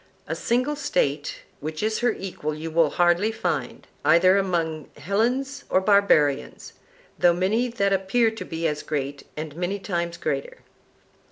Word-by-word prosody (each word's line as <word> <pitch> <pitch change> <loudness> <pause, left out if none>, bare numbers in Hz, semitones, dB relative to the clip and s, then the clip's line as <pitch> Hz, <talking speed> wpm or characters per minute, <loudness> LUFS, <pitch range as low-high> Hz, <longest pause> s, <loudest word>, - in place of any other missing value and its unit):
A - - -2
single 255 +5 0
State 150 - -1 0.2
which 155 +5 -5
is 220 0 0
her 240 -1 +2
equal 180 -7 -5
you 160 +1 -6
will 160 -1 +3
hardly 175 +7 +2
find, 225 - -3 0.2
either 185 +3 +5
among 170 -6 -1
Hellenes 235 - -1
or - - +4
barbarians, 190 -8 +2 0.5
though 175 -1 +5
many 200 +8 +1
that 200 -5 0
appear 210 +5 +2
to 225 - -7
be 165 0 -2
as 150 -1 -2
great 140 -2 -4
and 155 -1 -5
many 180 +4 -2
times 170 -3 -3
greater. - - -3
185 Hz, 150 wpm, -24 LUFS, 160-220 Hz, 0.5 s, either